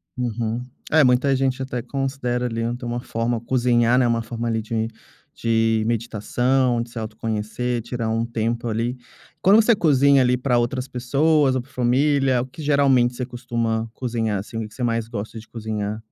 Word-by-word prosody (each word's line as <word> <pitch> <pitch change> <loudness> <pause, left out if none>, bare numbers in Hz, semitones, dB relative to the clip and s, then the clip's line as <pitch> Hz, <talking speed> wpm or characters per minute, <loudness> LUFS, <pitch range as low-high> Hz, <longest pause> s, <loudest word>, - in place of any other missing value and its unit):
Uhum. 120 0 -2 0.3
É 155 -1 +6
muita 130 +2 +3
gente 135 0 0
até 125 -2 -3
considera, 130 -2 -2
ali, 115 -1 -2
ainda 120 +1 -3
uma 120 +1 -2
forma 115 0 -2
cozinhar, 120 -1 +2
né, 125 - +3
uma 115 -1 +1
forma, 115 +1 -4
ali, 110 -1 0
de 110 0 -2 0.5
de 115 -1 +2
meditação, 120 +2 0
de 120 - -6
se 120 - -11
autoconhecer, 110 +2 -3
tirar 120 -2 -3
um 115 +1 0
tempo, 115 +1 -2
ali. 115 +3 -1 0.4
Quando 205 +4 +6
você 230 0 +4
cozinha, 140 -5 +4
ali, 125 0 +3
pra 125 -1 +1
outras 125 +2 -1
pessoas 140 +3 +2
ou 130 - 0
pra 135 - -18
família, 130 0 +2
o - - -3
que 160 - -17
geralmente 135 -4 +3
você 125 - -4
costuma 115 -2 -2
cozinhar, 115 -5 -2
assim, 115 +3 -6
que 110 - -5
que - - -19
você 130 - -9
mais 115 -2 0
gosta 110 0 -6
de 110 - -14
cozinhar? 110 -1 -4
120 Hz, 180 wpm, -22 LUFS, 115-130 Hz, 0.5 s, É